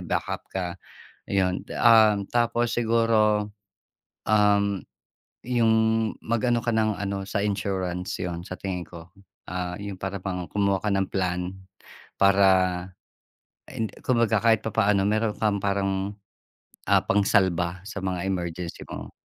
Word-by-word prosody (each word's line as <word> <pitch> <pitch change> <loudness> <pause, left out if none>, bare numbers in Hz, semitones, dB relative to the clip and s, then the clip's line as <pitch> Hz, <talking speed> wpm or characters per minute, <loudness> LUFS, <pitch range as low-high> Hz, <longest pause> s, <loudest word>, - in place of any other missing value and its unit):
backup - - -3
ka, 95 -2 -3 0.7
ayun. 95 -1 +1 0.2
Um, 110 -4 +5
tapos 120 0 +1
siguro, 110 -3 +2 0.8
um, 100 -2 +3 0.6
'yung 115 -2 +3 0.5
mag-ano 115 +1 +1
ka - - -2
ng 110 -2 +1
ano, 100 -1 -3
sa 100 +1 -2
insurance, 95 -3 -2
'yun, 85 -2 -3
sa 95 - -6
tingin 90 -3 -3
ko, 85 0 -12 0.4
ah,' 90 -1 -3
yung 100 -2 -6
para 95 +1 -3
bang 90 -2 -3
kumuha 100 -2 +1
ka 105 - 0
ng 95 -1 +1
plan 90 -1 -1 0.6
para 95 -2 +3 0.8
and, 110 -1 -3
kumbaga 115 -4 +2
kahit 110 -2 +4
papaano 105 -2 +2
meron 110 0 0
kang 105 -2 +1
parang, 100 0 -1 0.7
ah, - - +4
pangsalba 95 -3 +2
sa 105 -1 -5
mga 90 -1 -2
emergency 85 -2 -4
mo. - - -7
100 Hz, 125 wpm, -25 LUFS, 95-110 Hz, 0.8 s, Um